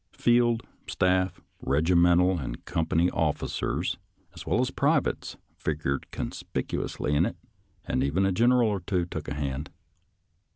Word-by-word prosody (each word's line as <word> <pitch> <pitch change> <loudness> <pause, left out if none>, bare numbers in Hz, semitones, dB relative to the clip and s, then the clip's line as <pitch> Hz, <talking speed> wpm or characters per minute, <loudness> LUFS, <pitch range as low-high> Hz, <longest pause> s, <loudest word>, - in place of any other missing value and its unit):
Field, 120 -1 +3 0.2
staff, 95 0 +1 0.2
regimental, 85 +5 +3
and - - -6
company 85 -1 +1
officers, 75 -3 -1 0.4
as - - -10
well - - +2
as - - +1
privates, - - 0 0.2
figured 75 -3 -2
conspicuously 75 - -3
in 75 +3 +4
it, 110 - -2 0.5
and 65 - 0
even 80 +8 +1
a 95 - +2
general 120 +4 +4
or 100 -2 -1
two 90 0 -1
took 80 -3 -6
a 70 - -3
hand. 70 0 -3
85 Hz, 130 wpm, -27 LUFS, 75-95 Hz, 0.5 s, in